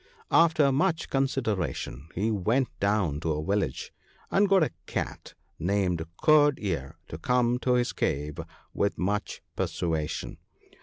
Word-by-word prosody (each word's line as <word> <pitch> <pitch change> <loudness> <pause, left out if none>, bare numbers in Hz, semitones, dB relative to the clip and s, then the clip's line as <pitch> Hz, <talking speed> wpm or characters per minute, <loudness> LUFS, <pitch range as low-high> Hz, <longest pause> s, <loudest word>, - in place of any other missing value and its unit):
After 160 -4 +5
much 165 +4 0
consideration 100 - -1
he 105 +5 0
went 110 +5 +1
down 100 -8 +1
to 80 0 -1
a 75 +1 -3
village, 100 +1 -1 0.4
and 200 0 +3
got 195 -3 +5
a - - -1 0.2
Cat - - -4 0.2
named 90 -2 0 0.2
Curd 150 -2 +6
ear 80 -6 -3
to 80 - -7
come 125 +4 +2
to 125 0 +1
his 120 -1 +1
cave 75 +3 -2 0.3
with 100 - 0
much 100 +3 -2
persuasion. 80 -2 -2
100 Hz, 135 wpm, -27 LUFS, 80-135 Hz, 0.4 s, Curd